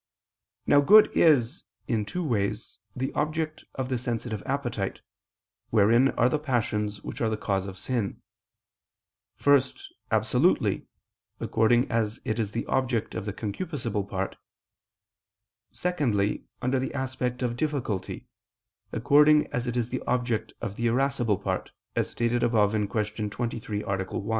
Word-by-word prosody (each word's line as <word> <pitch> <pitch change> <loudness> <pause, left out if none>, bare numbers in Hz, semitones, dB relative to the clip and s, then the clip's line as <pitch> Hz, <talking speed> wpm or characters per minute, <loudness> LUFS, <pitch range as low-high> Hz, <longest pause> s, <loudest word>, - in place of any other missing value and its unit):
Now 145 - +5
good 210 +9 +7
is, 145 -3 +4 0.2
in 110 -3 0
two 180 - -3
ways, 105 -9 -2 0.2
the 130 +2 -2
object 155 +1 -2
of 130 -2 -2
the 130 -2 -1
sensitive 115 -3 -3
appetite, 120 -8 -2 0.7
wherein 115 +5 +5
are 120 - +5
the 150 +4 +1
passions 105 -7 -1
which - - -6
are 115 - +2
the 110 - -1
cause 100 -2 -1
of 95 -1 -7
sin: 110 0 -2 1.2
first, 140 -2 +2 0.2
absolutely, - - +2 0.5
according 120 +3 +2
as 110 -2 0
it 110 +1 -1
is 105 -3 -1
the 115 - -3
object 130 -4 0
of - - -4
the 105 - -3
concupiscible 110 - -3
part; 95 0 -3 1.3
secondly, 125 - 0 0.2
under 130 +1 +1
the 130 - -3
aspect 130 -1 -2
of 120 -1 -1
difficulty, 125 -9 -2 0.7
according 150 +5 +5
as 125 0 -1
it 120 0 -2
is 120 -1 0
the 130 - -2
object 120 -3 0
of 100 - -4
the 120 - +1
irascible 120 -3 +1
part, 95 -1 -3 0.3
as - - 0
stated 120 +1 0
above 110 -4 +3
(Q. 105 0 -1
23, 110 -2 -3
A. 95 -1 -1
1). 100 +3 -5
120 Hz, 140 wpm, -27 LUFS, 105-130 Hz, 1.3 s, good